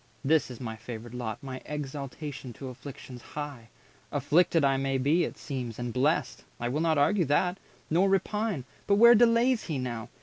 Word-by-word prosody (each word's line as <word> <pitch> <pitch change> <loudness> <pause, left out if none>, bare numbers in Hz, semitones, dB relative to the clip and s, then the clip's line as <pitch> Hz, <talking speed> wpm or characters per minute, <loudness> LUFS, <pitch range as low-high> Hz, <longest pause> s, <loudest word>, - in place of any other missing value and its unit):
This 155 0 +3
is 125 - -9
my 115 -3 -5
favoured 115 +1 -8
lot, 115 -4 -4
My 130 -1 -6
exaltation 140 -2 -6
to 130 +3 -7
afflictions 125 -1 -10
high! 140 -6 -7 0.4
Afflicted 165 -1 +3
I 135 0 +3
may 135 0 0
be, 150 +6 +3
it - - -7
seems, 125 -6 -5
and 120 -1 -4
blest! 145 +6 0 0.2
I 120 - -1
will 145 +5 -1
not 160 -2 +2
argue 165 +6 +3
that, 175 +6 +1 0.3
nor 180 +5 +3
will 195 - +5
repine. 210 - -2 0.2
But 200 - +4
where 235 +3 +9
delays 235 +1 +4
he 155 -5 -2
now? 120 -3 -4
140 Hz, 180 wpm, -28 LUFS, 125-170 Hz, 0.4 s, where